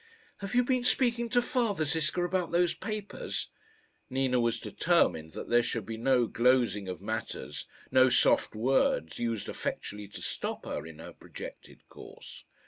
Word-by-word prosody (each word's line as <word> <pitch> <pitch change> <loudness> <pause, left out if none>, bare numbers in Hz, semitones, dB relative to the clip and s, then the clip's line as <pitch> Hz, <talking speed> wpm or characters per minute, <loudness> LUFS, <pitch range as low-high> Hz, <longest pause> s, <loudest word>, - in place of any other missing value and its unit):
"Have 200 +2 -5
you 250 - +5
been 255 0 +1
speaking 240 -2 +2
to 245 +1 +3
father, 230 - 0
Ziska, 160 +3 +1
about 180 -1 -1
those 175 0 +3
papers?" 210 0 -5 0.6
Nina 130 -1 +1
was 115 -1 +1
determined 80 0 +1
that - - -6
there 120 0 +5
should 115 -3 -3
be 115 - -5
no 125 +1 +3
glozing 120 -5 +2
of 90 - -5
matters, 70 -2 -4 0.2
no 130 0 +6
soft 120 - +3
words 110 - +1
used 115 -3 -2
effectually 105 0 -4
to 100 - -10
stop - - -4
her 75 - -4
in 80 -2 -11
her 80 - -10
projected - - -11
course. - - -12
130 Hz, 155 wpm, -30 LUFS, -, 0.6 s, no